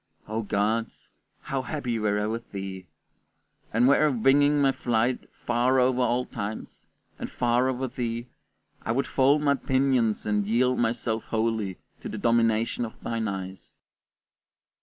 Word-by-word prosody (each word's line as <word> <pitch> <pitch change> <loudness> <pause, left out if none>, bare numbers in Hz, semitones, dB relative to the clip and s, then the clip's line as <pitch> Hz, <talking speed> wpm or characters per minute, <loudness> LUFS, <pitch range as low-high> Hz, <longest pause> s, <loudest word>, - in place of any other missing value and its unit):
O 110 +2 -2
God, 110 +2 0 0.5
how 135 -1 -2
happy 125 -4 -3
were 105 -1 +1
I 105 - 0
with 115 +2 -4
thee! 95 -2 -6 0.8
And 120 +3 +3
were 145 +2 +5
I - - +3
winging 145 +4 +4
my 135 -1 +4
flight 120 -1 -1 0.2
far 125 +2 +2
over 125 0 +2
all 125 +1 +1
times, 110 -3 -6 0.3
and - - -4
far 120 +1 +1
over 130 0 -2
thee, 120 -1 -3 0.6
I 115 - -1
would 135 +3 0
fold 140 +3 +3
my 140 -1 +4
pinions 130 -5 +1
and 105 -1 0
yield 125 +3 +2
myself 115 -1 -1
wholly 110 -4 -1 0.2
to - - -6
the - - -5
domination 115 0 +2
of 115 - -7
thine 115 -1 -2
eyes. 95 -1 -7
115 Hz, 150 wpm, -26 LUFS, 110-130 Hz, 0.8 s, were